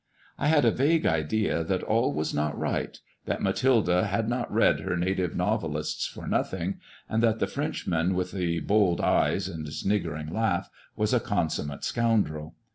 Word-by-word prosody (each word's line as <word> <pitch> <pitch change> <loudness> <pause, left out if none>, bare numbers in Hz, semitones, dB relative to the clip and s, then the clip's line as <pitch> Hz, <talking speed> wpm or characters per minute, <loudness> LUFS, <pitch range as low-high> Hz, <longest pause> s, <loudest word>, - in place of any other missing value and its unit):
I - - +1
had 150 -3 +4
a 115 - +5
vague 155 +7 +2
idea 80 +3 +1
that 95 +3 -1
all 115 -5 +2
was 75 +2 -2
not 75 0 -1
right - - -2
— - - -35
^that - - -1
Mathilde 125 -7 +2
had 100 +5 +1
not 120 +1 -2
read - - +3
her 90 - -2
native 90 -1 -1
novelists - - -1
for - - -9
nothing; 95 +1 -1 0.3
and 110 - 0
that 115 -1 +3
the - - +1
Frenchman 85 +2 -1
with 90 0 -1
the 85 -3 -1
bold 100 -5 +2
eyes - - +2
and 80 -5 -6
sniggering 80 -5 -2
laugh 110 -6 0 0.2
was 105 +2 0
a 125 - +4
consummate 80 -9 -2
scoundrel. 100 -10 0
95 Hz, 170 wpm, -27 LUFS, 80-110 Hz, 0.3 s, a